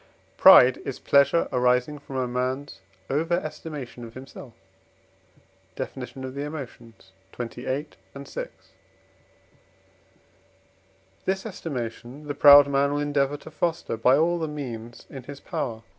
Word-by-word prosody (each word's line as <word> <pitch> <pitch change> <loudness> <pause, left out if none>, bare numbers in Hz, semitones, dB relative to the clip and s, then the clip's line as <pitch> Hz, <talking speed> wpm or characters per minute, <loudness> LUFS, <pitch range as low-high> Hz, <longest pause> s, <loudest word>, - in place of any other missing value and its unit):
Pride 125 0 +8
is 135 - -5
pleasure 140 +4 +3
arising 125 +3 +1
from 140 -1 -10
a 130 -1 0
man's 130 -2 -3 0.3
over 160 +5 0
estimation 150 -6 -6
of 115 -1 -11
himself 130 -2 -11 1.2
(Def. 130 - -5
of 130 0 -7
the 140 - -5
Emotions, 125 -9 -9 0.3
xxviii. 125 +4 -3 0.3
and 140 0 -9
vi.); - - -5 2.8
this 190 +2 -1
estimation 130 - -6
the 145 - -3
proud 145 0 +8
man 140 0 +1
will 145 - -1
endeavour 145 -1 0
to 155 - -13
foster 165 -4 -2
by 125 +4 +4
all 170 +3 +2
the 160 - -2
means 120 -6 -7
in 135 - -9
his 140 +2 -10
power 120 -4 -4
(III. 110 - -18
140 Hz, 130 wpm, -25 LUFS, 125-145 Hz, 2.8 s, Pride